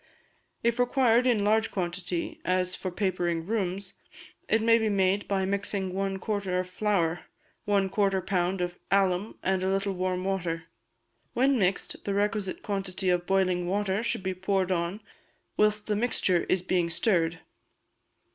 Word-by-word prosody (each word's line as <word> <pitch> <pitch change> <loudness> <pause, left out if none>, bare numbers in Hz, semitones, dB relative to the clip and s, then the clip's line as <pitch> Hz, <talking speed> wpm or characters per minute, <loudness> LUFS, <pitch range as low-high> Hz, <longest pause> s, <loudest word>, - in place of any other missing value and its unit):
If 235 +1 +1
required 245 -1 +3
in 225 -5 +3
large 220 +2 +3
quantity, 180 -1 -3
as 185 0 0
for 185 - -4
papering 175 -3 -1
rooms, 195 -2 -2 0.6
it 220 - +4
may 230 +1 +4
be 220 -1 +1
made 195 0 +1
by 195 -1 0
mixing 195 -1 -2
one 195 0 -1
quartern 195 -2 -2
of 180 0 0
flour, 180 -3 0 0.4
one 200 -2 +2
quarter 195 0 +1
pound 185 0 -1
of 175 0 -3
alum, 195 +1 +1
and 190 0 +1
a 190 - 0
little 195 +1 0
warm 185 0 -1
water; 175 -4 -2 0.7
when 265 +1 +3
mixed, 190 -1 0
the 200 - -2
requisite 205 -1 -1
quantity 195 -2 -2
of 175 0 0
boiling 185 -2 +1
water 200 +1 0
should 230 -4 -1
be 190 0 -1
poured 190 0 0
on 175 +4 -1 0.5
whilst 210 0 +2
the 210 - 0
mixture 205 -6 +2
is 185 -1 +1
being 175 -2 +1
stirred. 170 -2 +1
190 Hz, 155 wpm, -28 LUFS, 180-205 Hz, 0.7 s, it